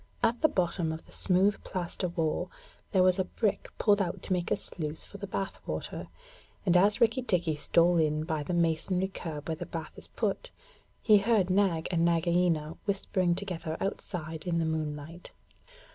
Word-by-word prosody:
At 230 +1 +2
the 310 - +6
bottom 175 -2 0
of 160 0 -6
the - - -18
smooth 195 +2 +2
plaster 180 0 -3
wall 165 -3 -1 0.4
there 185 -3 +4
was 185 +1 +4
a - - +3
brick 210 +2 -1
pulled 205 -2 +4
out 175 -3 -3
to - - -1
make 180 -1 -1
a - - +3
sluice 160 -6 -5
for 200 - -11
the 200 - -5
bath 195 0 -3
water, - - -4 0.6
and 180 -2 +3
as 200 +3 +5
Rikki 235 +3 +3
tikki 175 -9 +1
stole 170 +3 +3
in 155 -1 +2
by 160 -2 -2
the 160 +5 -2
masonry 170 +3 +1
curb 160 -6 -6
where 160 -1 -2
the - - -6
bath 165 -2 -6
is - - -6
put, - - -2 0.5
he 210 -2 +7
heard 200 -3 +2
Nag 185 -4 +2
and 170 -2 +2
Nagaina 170 -2 +2
whispering 185 -3 +1
together 170 -4 -4
outside 165 -5 -4
in 170 -1 +1
the 165 - +1
moonlight. 155 +1 -4
175 Hz, 180 wpm, -30 LUFS, 160-195 Hz, 0.6 s, he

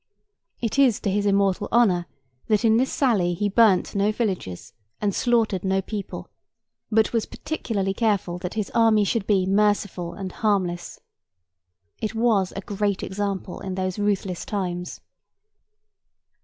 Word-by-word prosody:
It 235 +3 -1
is 255 -6 +4
to 200 - 0
his 205 +1 +1
immortal 200 0 +2
honour 190 -7 +3 0.4
that 215 +1 +2
in 220 0 +5
this 260 +2 +1
sally 200 -10 +1
he 205 +4 0
burnt 205 -2 +4
no 205 +1 +2
villages 190 - -3 0.3
and 205 -2 0
slaughtered 225 -6 +1
no 190 0 +1
people, 200 +1 -6 0.6
but 220 +1 +3
was 230 -2 0
particularly 205 -11 -3
careful 200 -5 0
that 180 +2 -5
his 210 -3 -2
army 225 -2 +4
should 205 0 -1
be 195 -3 +3
merciful 200 -3 +1
and 190 -2 -5
harmless. 185 -5 -1 1.0
It 215 +1 -3
was 220 -5 +2
a 195 - -4
great 200 0 -2
example 195 -2 -3
in 190 -1 -5
those 185 0 -2
ruthless 195 -3 -1
times. 180 -3 -4
200 Hz, 140 wpm, -24 LUFS, 190-220 Hz, 1.0 s, in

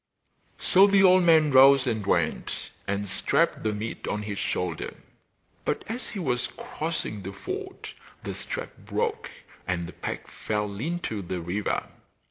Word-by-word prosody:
So 195 +2 +6
the 200 -1 +5
old 185 0 +7
man 160 -3 +5
rose 135 0 +7
and 110 -4 -1
went, 85 -5 -1 0.2
and 100 +1 -1
strapped 95 - +1
the 110 - 0
meat 105 +2 -5
on 105 - -2
his 105 -1 -4
shoulder; 90 - -2 0.7
but - - -1
as 240 +4 -4
he 215 - -7
was 125 -9 0
crossing 155 -10 -4
the 95 - -6
ford 95 - -6 0.3
the - - -4
strap - - -5
broke - - -2 0.4
and 85 -2 -1
the 90 - -9
pack - - -5
fell 105 -2 -3
into 160 - -2
the 90 0 -4
river. 90 +5 -1
110 Hz, 150 wpm, -27 LUFS, 100-160 Hz, 0.7 s, old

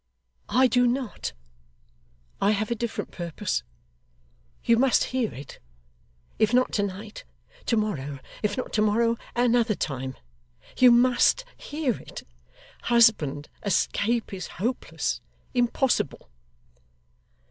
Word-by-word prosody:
'I 260 +1 +4
do 245 -1 +4
not. 250 -2 -2 1.1
I 200 - +4
have 215 +2 -2
a - - +2
different 235 0 -4
purpose. 175 +3 -3 1.0
You 230 - +4
must 260 +1 +4
hear 250 -4 0
it. 135 +1 -10 0.8
If 220 +2 +3
not 255 0 +3
to 205 - +1
night, 205 +2 -5 0.4
to 230 - +2
morrow; 145 -10 -2 0.2
if 205 -1 -1
not 255 - -4
to 215 - +2
morrow, 230 +2 +2 0.2
at 240 +1 +3
another 235 -2 +3
time. 130 -4 -3 0.6
You 255 - +7
MUST 250 - +4
hear 290 -6 -2
it. - - -9 0.6
Husband, 210 - +3 0.2
escape 220 +2 0
is 185 -2 -5
hopeless 235 +8 -2 0.3
impossible. 240 - 0
225 Hz, 115 wpm, -26 LUFS, 200-245 Hz, 1.1 s, You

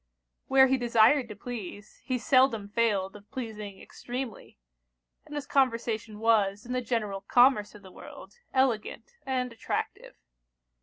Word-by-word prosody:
Where 265 0 +6
he 265 0 +1
desired 240 +2 +4
to 210 - -7
please, 205 -3 -8
he 255 -2 -1
seldom 245 -5 +2
failed 205 -3 0
of 205 0 -14
pleasing 215 -5 -7
extremely; 245 -3 -7 0.7
and 295 - -8
his 290 -1 -4
conversation 230 -5 0
was, 210 -2 +2
in 250 - -5
the 255 - 0
general 215 -5 -2
commerce 245 -3 +3
of 210 - -14
the 190 - -13
world, 475 - -13
elegant 260 - 0 0.2
and 250 -2 -1
attractive. 230 - -4
230 Hz, 140 wpm, -28 LUFS, 210-255 Hz, 0.7 s, Where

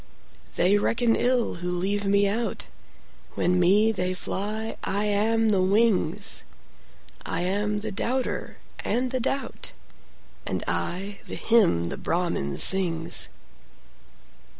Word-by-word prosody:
They 200 +3 +3
reckon 230 +2 +2
ill 245 -6 +1
who 180 - -2
leave 195 +3 -1
me 200 0 +3
out; 225 +4 -2 0.7
When 180 0 +1
me 205 +5 +4
they 185 -3 -1
fly, 215 +4 -4
I 200 +2 0
am 220 +2 +2
the 195 -3 +3
wings;I 200 -2 -2
am 205 +3 -1
the 220 0 -4
doubter 250 +6 -2 0.3
and 250 +1 0
the 260 - -1
doubt, 270 +3 -3 0.7
And - - -3
I 195 +3 -2
the - - -5
hymn 180 - +3
the - - -5
Brahmin 165 - -1
sings. 170 -4 +3
205 Hz, 115 wpm, -25 LUFS, 180-225 Hz, 0.7 s, me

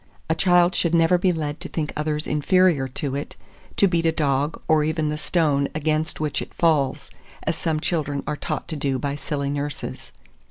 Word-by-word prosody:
A - - +5
child 175 0 +4
should 170 -1 +1
never 170 +2 +4
be 185 +1 +3
led 150 -3 -3
to 180 - -7
think 150 -2 -3
others 150 0 -1
inferior 150 -1 +3
to 135 +1 -4
it, 145 - -5 0.4
to 200 - +5
beat 170 -2 +1
a - - +4
dog, 145 -1 0
or 155 -1 +4
even 155 0 0
the 150 - -1
stone 150 -4 +1
against 155 0 -1
which 155 -1 -1
it - - -9
falls, 150 -6 +1 0.3
as - - 0
some 160 -2 -1
children 150 -4 -1
are 150 - -2
taught - - -4
to 160 - -3
do 140 -2 -1
by 140 +2 -2
silly 140 -2 -3
nurses. 145 0 -5
155 Hz, 195 wpm, -23 LUFS, 145-165 Hz, 0.4 s, A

